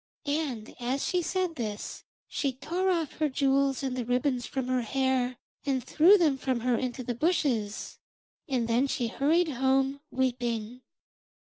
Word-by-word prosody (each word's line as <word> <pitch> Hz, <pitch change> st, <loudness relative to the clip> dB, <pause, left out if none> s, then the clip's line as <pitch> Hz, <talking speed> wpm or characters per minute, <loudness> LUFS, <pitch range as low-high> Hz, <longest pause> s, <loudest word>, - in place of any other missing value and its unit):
And 285 Hz, -7 st, -2 dB
as 255 Hz, +3 st, -1 dB
she 360 Hz, -, +1 dB
said 365 Hz, 0 st, -1 dB
this 215 Hz, -3 st, -4 dB, 0.2 s
she 275 Hz, -3 st, -1 dB
tore 350 Hz, +8 st, -1 dB
off 335 Hz, -5 st, -1 dB
her 305 Hz, -1 st, +2 dB
jewels 275 Hz, 0 st, +2 dB
and 260 Hz, -2 st, -1 dB
the 250 Hz, -, -2 dB
ribbons 250 Hz, +1 st, 0 dB
from 265 Hz, -2 st, -3 dB
her 255 Hz, -1 st, +1 dB
hair, 255 Hz, 0 st, 0 dB, 0.3 s
and 265 Hz, -3 st, 0 dB
threw 335 Hz, -, +6 dB
them 300 Hz, -7 st, +2 dB
from 255 Hz, -3 st, -1 dB
her 250 Hz, 0 st, +2 dB
into 255 Hz, +1 st, -3 dB
the 245 Hz, -, -2 dB
bushes, 240 Hz, -, 0 dB, 0.5 s
and 250 Hz, -4 st, 0 dB
then 240 Hz, +4 st, +2 dB
she 250 Hz, -4 st, -1 dB
hurried 320 Hz, +7 st, +2 dB
home, 270 Hz, +1 st, +1 dB
weeping. 245 Hz, -2 st, -1 dB
265 Hz, 155 wpm, -29 LUFS, 245-285 Hz, 0.5 s, threw